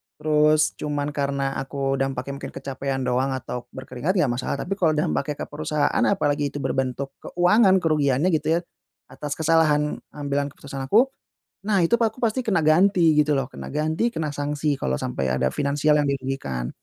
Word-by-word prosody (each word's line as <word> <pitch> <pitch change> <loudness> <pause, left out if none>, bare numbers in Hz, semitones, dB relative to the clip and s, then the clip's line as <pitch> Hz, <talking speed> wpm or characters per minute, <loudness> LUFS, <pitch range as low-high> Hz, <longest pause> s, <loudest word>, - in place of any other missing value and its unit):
terus 150 0 +3
cuman 145 0 -2
karena 140 -1 -2
aku 135 0 -2
dampaknya 135 +1 -2
mungkin - - -7
kecapekan 135 -1 -3
doang 130 +2 0
atau 125 -1 -6
berkeringat, 130 +7 -3
nggak 155 -9 +2
masalah. 130 - -2
Tapi 180 - -10
kalau 160 -4 +3
dampaknya 150 0 -1
ke - - -4
perusahaan, 150 0 0
apalagi 145 -4 0
itu 140 0 -6
berbentuk 135 +1 -2
keuangan, 190 +3 +3
kerugiannya 150 +1 +2
gitu 155 0 +1
ya, - - +2 0.5
atas 145 -1 -5
kesalahan 155 -2 +2 0.2
ambilan 145 -1 -1
keputusan 140 -1 -7
aku. 240 - +4 0.6
Nah, 205 -3 +3
itu 165 - +3
aku 225 +1 0
pasti 230 +2 +1
kena 195 -7 +2
ganti 165 +1 +4
gitu 150 0 +3
lho, 135 -2 -1
kena - - -8
ganti, 155 +8 0
kena 155 -6 -2
sanksi 145 +1 -1
kalau 65 0 -1
sampai 65 +1 -2
ada 65 0 +1
finansial 145 +2 +1
yang 145 - +1
dirugikan, 130 - -3
145 Hz, 170 wpm, -24 LUFS, 135-160 Hz, 0.6 s, aku